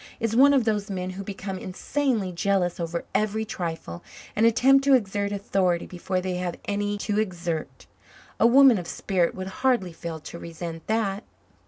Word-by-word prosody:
is 225 -1 -1
one 275 +3 +7
of 275 -3 +4
those 210 -2 0
men 185 -1 -3
who 190 +2 -6
become 195 -1 -5
insanely 215 +1 -1
jealous 180 0 0
over 170 0 -3
every 215 +1 0
trifle 165 - -5 0.3
and 225 +2 +4
attempt 270 +4 +5
to 275 -1 +6
exert 200 -3 -1
authority 190 -3 0
before 185 +1 -3
they 180 0 -3
have 180 -1 -3
any 205 0 -1
to 205 0 -1
exert. 175 -6 -3 0.5
A - - +6
woman 260 -3 +7
of 175 - -7
spirit 180 -3 0
would 185 - -5 0.2
hardly 240 -10 +2
fail 165 -1 -6
to 170 - -9
resent 165 -1 -7
that." 215 -2 0
195 Hz, 170 wpm, -25 LUFS, 175-220 Hz, 0.5 s, one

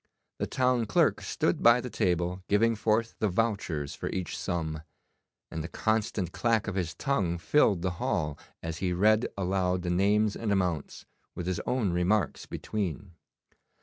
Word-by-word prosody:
The - - -1
town 125 -3 +1
clerk 100 - +3
stood - - 0
by 120 +1 +7
the 125 -1 -6
table 90 +1 0
giving 115 +3 +3
forth 110 +2 +1
the 110 - +2
vouchers 90 -8 -1
for - - -4
each 95 -3 -3
sum, 80 -3 -3 0.7
and 80 - -4
the - - -4
constant 105 -3 -1
clack 115 0 +1
of - - -2
his 90 -3 -2
tongue 95 -11 0
filled 95 - +3
the 90 - 0
hall, 75 -2 0 0.3
as 80 -1 -4
he 90 -1 0
read 110 +5 +3
aloud 90 -1 0
the 90 - -1
names 105 +3 +2
and 110 -2 -2
amounts, 90 -6 -1 0.3
with 90 - -4
his 90 -1 -1
own 115 -8 +1
remarks 95 +4 +1
between. 100 -2 -4
95 Hz, 160 wpm, -29 LUFS, 85-110 Hz, 0.7 s, by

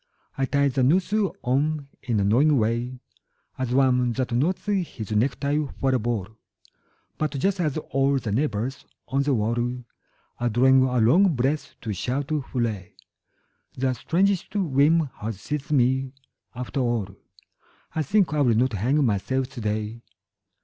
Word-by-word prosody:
I 135 - 0
tie 140 +1 +2
the 135 -1 0
noose 180 +10 +2 0.3
on 140 +3 0
in 115 -4 -1
a - - +2
knowing 135 +9 +4
way 120 +3 -1 0.6
As 130 -2 -2
one 125 -2 +3
that 130 0 -2
knots 155 +10 0
his 180 - -2
necktie 140 +7 +1 0.2
for 135 -1 +1
a 130 - +2
ball; 110 -4 -2 0.9
But 155 -2 -1
just 195 +7 0
as 155 -4 0
all 135 -2 +1
the 115 -5 -3
neighbours 125 +1 -1 0.3
on 135 +2 +1
the 140 -1 +1
wall 110 +1 0 0.8
Are 120 0 +1
drawing 130 +3 +5
a 130 -1 +1
long 165 - +4
breath 135 +5 -1
to 110 -3 -3
shout 135 - -3
'Hurray!' 120 -10 -2 0.8
The 130 0 +1
strangest 185 - 0
whim 155 -4 +2
has 105 -2 -5
seized 145 +4 -4
me... 130 -1 +2 0.4
After 125 +3 -4
all 115 -6 -1 0.8
I 160 - 0
think 190 +2 +2
I 150 - +1
will 120 -5 +3
not 125 +2 +2
hang 130 +9 +1
myself 125 +5 0
today. 110 -2 -3
130 Hz, 150 wpm, -25 LUFS, 120-145 Hz, 0.9 s, drawing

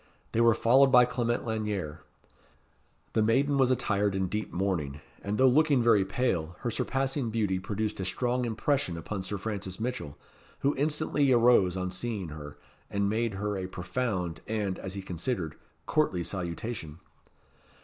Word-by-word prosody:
They 115 - +2
were 115 -1 +5
followed 130 +4 +5
by 125 -1 +8
Clement 120 -1 -1
Lanyere. 105 -8 -3 1.1
The 110 - +3
maiden 135 +6 +2
was 130 -2 +4
attired 100 -5 +1
in 95 -1 0
deep 105 +3 -2
mourning, 85 -7 -1 0.2
and 100 +1 -2
though 130 - +6
looking 140 -1 +4
very 110 -4 +5
pale, 90 -8 -1
her 120 - -1
surpassing 135 +2 -1
beauty 105 -4 0
produced 105 +3 -3
a 95 - -2
strong 125 +5 0
impression 115 - 0
upon 95 +4 -4
Sir 100 +2 -4
Francis 100 -2 -4
Mitchell, 120 - -4 0.4
who 140 +1 +2
instantly 150 -1 +1
arose 115 -7 +5
on 90 0 -2
seeing 100 -2 -3
her, 75 -1 -8 0.3
and 100 0 0
made 115 -1 0
her 105 +1 -2
a 95 -1 -3
profound, 95 -2 -3
and, 105 -4 -2
as 95 0 -5
he 100 - -5
considered, 90 - -3 0.3
courtly 95 - +1
salutation. 85 -2 -4
105 Hz, 155 wpm, -29 LUFS, 95-125 Hz, 1.1 s, by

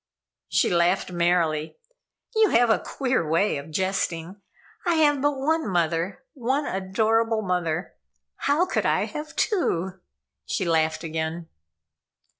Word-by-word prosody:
She - - +2
laughed 175 +2 +2
merrily. 170 -3 +1 0.6
"You 440 -2 +5
have 235 -3 +4
a - - +3
queer 260 -8 -1
way 170 +4 +2
of 140 +3 -8
jesting. 185 +1 -2 0.4
I 345 -2 +2
have 295 -3 +3
but 290 0 +1
one 315 +1 0
mother, 170 +6 0
one 265 +3 -1
adorable 220 +4 +1
mother. 175 -2 -1 0.4
How 300 +6 +2
could 370 - 0
I - - +2
have 300 +1 -7
two?" 190 - +1
and 190 - -29 0.5
she 190 - -1
laughed 160 -1 +1
again. 160 +1 -4
190 Hz, 130 wpm, -25 LUFS, 165-265 Hz, 0.6 s, You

